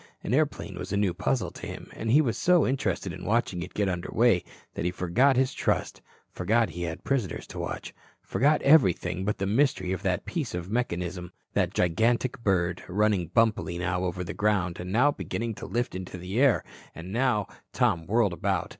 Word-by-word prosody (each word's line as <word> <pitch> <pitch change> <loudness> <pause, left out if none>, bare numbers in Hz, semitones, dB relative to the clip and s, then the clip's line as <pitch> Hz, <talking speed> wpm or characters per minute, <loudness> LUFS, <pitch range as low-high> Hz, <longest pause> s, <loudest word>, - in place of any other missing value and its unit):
An - - -2
airplane 135 - 0
was 95 - -6
a 100 - 0
new 100 -3 +1
puzzle 100 +2 -1
to - - -8
him, - - -8
and 110 - -4
he 140 +7 +6
was 120 -6 0
so 180 -4 +4
interested 100 -8 -1
in 95 - -9
watching 105 -5 0
it 90 - -8
get 105 -1 +1
under 90 -1 -3
way 115 -6 +3 0.3
that - - -4
he 90 - +1
forgot 95 +10 +2
his 130 +1 +2
trust, - - -1 0.3
forgot 110 +2 +1
he 90 +3 -7
had 85 +1 -4
prisoners 130 -9 -1
to - - -8
watch, - - -5 0.3
forgot 150 +4 +1
everything 95 - +4
but 105 - 0
the 95 - -2
mystery 100 -4 +1
of 95 - -2
that 90 -2 -1
piece 150 - -3
of 90 +2 -5
mechanism, 90 -6 -2 0.2
that - - +1
gigantic 115 +8 +1
bird, 90 -3 +1
running 100 -2 +1
bumpily 105 -2 +1
now 90 +1 -1
over 90 0 -2
the 100 +3 -5
ground 105 -5 0
and 90 +1 -5
now 130 +8 +4
beginning 115 -5 -4
to - - -8
lift 120 +1 -1
into 95 0 -6
the 90 +6 -3
air, 140 -5 +4 0.3
and 90 +4 -8
now 120 -4 +2 0.3
Tom 80 -1 +1
whirled 105 -3 +2
about. - - -1
100 Hz, 200 wpm, -27 LUFS, 90-120 Hz, 0.3 s, he